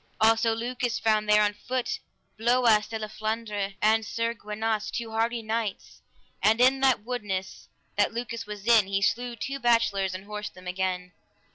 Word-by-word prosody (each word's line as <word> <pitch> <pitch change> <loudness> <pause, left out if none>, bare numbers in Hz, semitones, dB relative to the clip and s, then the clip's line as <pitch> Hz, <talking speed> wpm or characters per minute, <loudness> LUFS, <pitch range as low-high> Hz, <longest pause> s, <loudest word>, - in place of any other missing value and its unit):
Also 225 +1 +4
Lucas 245 +1 -2
found 215 -1 +1
there 210 0 +6
on 210 0 +1
foot, 245 +4 -3 0.4
Bloias 230 -2 +3
de 225 - -3
La 215 -1 -4
Flandres, 215 -2 -3
and 220 +1 +4
Sir 230 +2 -1
Gwinas, 215 -1 -2
two 230 -2 -4
hardy 230 +1 0
knights, 220 -2 -3 0.4
and 220 +2 +4
in 260 +2 +5
that 265 -5 +3
woodness 205 -6 -4 0.3
that 205 - +3
Lucas 230 -1 -5
was 210 -1 -7
in, 225 -4 +5
he 195 0 0
slew 240 +3 0
two 270 +5 -4
bachelors 205 -6 +2
and 190 +1 -8
horsed 210 0 -6
them 185 0 -13
again. 180 0 -2
220 Hz, 165 wpm, -27 LUFS, 210-235 Hz, 0.4 s, there